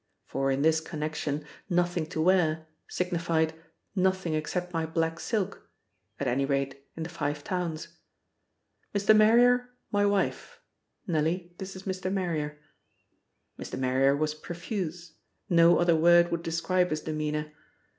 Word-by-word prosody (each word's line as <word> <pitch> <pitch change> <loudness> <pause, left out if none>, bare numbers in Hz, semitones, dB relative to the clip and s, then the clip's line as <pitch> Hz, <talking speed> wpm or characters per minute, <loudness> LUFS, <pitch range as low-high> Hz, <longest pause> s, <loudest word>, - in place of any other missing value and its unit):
For 135 0 -1
in 135 +1 +1
this 160 0 +4
connection 150 -1 -3 0.2
"nothing 175 -2 +1
to 155 - -5
wear" 160 -2 +3 0.2
signified 170 -3 0 0.4
"nothing 185 -3 +1
except 175 +4 -2
my 165 -1 0
black 165 +1 -1
silk" 210 -5 -3 0.5
at 140 - -1
any 125 +3 +1
rate, 135 0 -1
in 165 - -3
the - - -4
Five 150 -3 -3
Towns. 170 -3 -4 1.0
"Mr. 200 +2 +5
Marrier 245 +3 +5 0.2
my 205 0 +3
wife. 205 - -1 0.5
Nellie, 170 +2 -1
this 190 0 -6
is 190 - -9
Mr. 185 -1 -3
Marrier." 160 -6 -2 1.0
Mr. - - -6
Marrier 130 +2 +2
was 155 0 0
profuse: 175 0 -5 0.4
no 170 0 +6
other 175 -1 +4
word 175 +2 +5
would 170 -1 -1
describe 180 +2 0
his 155 0 -2
demeanour. 150 -1 -3
165 Hz, 135 wpm, -28 LUFS, 155-185 Hz, 1.0 s, no